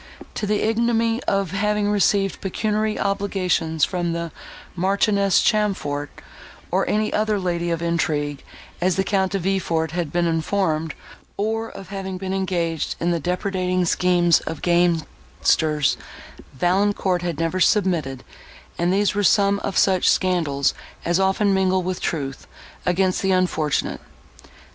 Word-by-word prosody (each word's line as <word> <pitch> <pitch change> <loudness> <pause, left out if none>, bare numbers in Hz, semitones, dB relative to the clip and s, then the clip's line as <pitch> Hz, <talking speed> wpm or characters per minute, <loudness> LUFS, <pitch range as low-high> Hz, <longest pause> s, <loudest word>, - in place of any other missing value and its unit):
To 210 - -3
the 210 0 +1
ignominy 230 +1 +1
of 195 -3 0
having 210 +1 0
received 200 -1 +1
pecuniary 215 +2 -1
obligations 185 -6 0
from 175 -2 -2
the 170 -1 -4 0.4
Marchioness 200 +1 +2
Chamfort, 190 -10 0 0.6
or - - +1
any 215 0 0
other 215 0 +1
lady 175 -2 -1
of 170 0 -2
intrigue, 150 -4 -1 0.4
as 180 0 +2
the 190 - +1
Count 190 -2 0
De - - +2
Villefort 170 -4 -1
had 165 -3 -3
been 175 0 +1
informed, 165 -1 0 0.4
or 225 +2 -1
of 195 -1 -11
having 190 -1 -5
been 190 0 -4
engaged 175 -4 -1
in 170 +1 0
the 170 - 0
depredating 180 +1 -1
schemes 175 -1 +3
of 160 - -5
gamesters, 160 -4 +1 0.6
Valancourt 185 +3 +1
had 170 -3 -3
never 165 +3 -1
submitted; 170 -10 +1 0.6
and 175 +1 +2
these 200 +1 +2
were 205 +1 0
some 200 0 +3
of 200 - -3
such 190 -2 +4
scandals 165 -7 +1 0.3
as 175 +2 +2
often 195 +1 +2
mingle 190 -1 +2
with 185 0 -3
truth, 135 -4 -3 0.4
against 185 +1 +1
the 195 - +1
unfortunate. 175 -5 0
185 Hz, 135 wpm, -22 LUFS, 170-200 Hz, 0.6 s, such